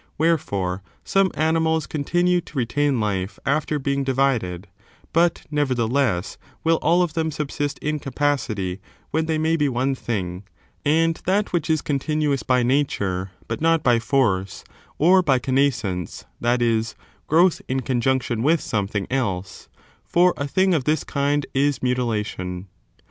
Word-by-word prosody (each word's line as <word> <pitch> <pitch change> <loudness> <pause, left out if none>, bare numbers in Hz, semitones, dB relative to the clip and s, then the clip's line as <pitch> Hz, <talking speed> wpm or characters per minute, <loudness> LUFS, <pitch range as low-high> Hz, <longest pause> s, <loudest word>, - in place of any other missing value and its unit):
Wherefore, 100 - 0 0.2
some 195 -1 +2
animals 160 0 +1
continue 175 +4 +1
to 155 -3 -12
retain 135 +2 +1
life 100 -2 -2
after 150 +2 0
being 140 0 -1
divided: 125 -9 0 0.5
but, 170 +1 +2
nevertheless, 130 -8 0 0.2
will 165 0 +3
all 170 +4 +3
of 170 -4 -3
them 160 -1 0
subsist 145 -1 -3
in 150 0 -1
capacity 120 -10 -1 0.3
when 160 +1 0
they 160 -1 0
may 160 +1 +1
be 150 -3 +1
one 130 +2 0
thing, 95 -7 -4 0.4
and 165 +2 +2
that 200 +2 +1
which 170 -3 0
is 155 -2 +1
continuous 145 0 0
by 125 -1 +2
nature, 100 -8 0 0.2
but 115 - -4
not 165 -1 +3
by 120 -2 +4
force, 110 -7 0 0.3
or 185 +5 +5
by 140 -7 +3
connascence, 125 - -1
that 120 +1 +1
is, 115 -1 0 0.3
growth 170 +3 +4
in 130 +1 -1
conjunction 125 -2 0
with 155 +6 +3
something 105 -4 -2
else; 95 -8 -3 0.3
for 180 +1 +3
a 140 - -3
thing 190 +5 +2
of 145 -6 0
this 155 -1 +1
kind 145 0 0
is 140 0 +1
mutilation. 105 -7 -2
140 Hz, 145 wpm, -23 LUFS, 115-155 Hz, 0.5 s, or